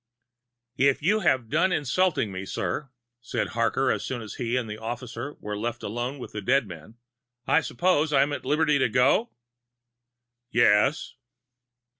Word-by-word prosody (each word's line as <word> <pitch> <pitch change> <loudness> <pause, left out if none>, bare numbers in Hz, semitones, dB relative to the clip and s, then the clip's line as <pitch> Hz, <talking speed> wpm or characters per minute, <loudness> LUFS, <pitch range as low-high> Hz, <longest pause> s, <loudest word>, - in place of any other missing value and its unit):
"If 140 +1 +3
you 210 +6 +3
have 130 - +1
done 165 +9 +2
insulting 155 - +1
me, 95 0 -5
sir," 95 +8 -3 0.3
said 120 - -2
Harker, - - +1
as - - -2
soon 120 -3 -4
as 105 - -8
he 120 +1 0
and 125 -3 -2
the 105 0 -7
officer 120 +4 -6
were 105 0 -5
left 120 +3 -4
alone 120 +6 -3
with 125 - -8
the 105 - -5
dead 130 +4 +2
man, 85 +4 -11 0.5
"I 155 - +3
suppose 160 -2 +1
I 140 -2 +5
am 145 +1 -2
at - - -4
liberty 150 -1 +2
to 130 - +2
go?" 135 - +3 1.2
"Yes." 120 +5 +3
125 Hz, 160 wpm, -26 LUFS, 110-150 Hz, 1.2 s, I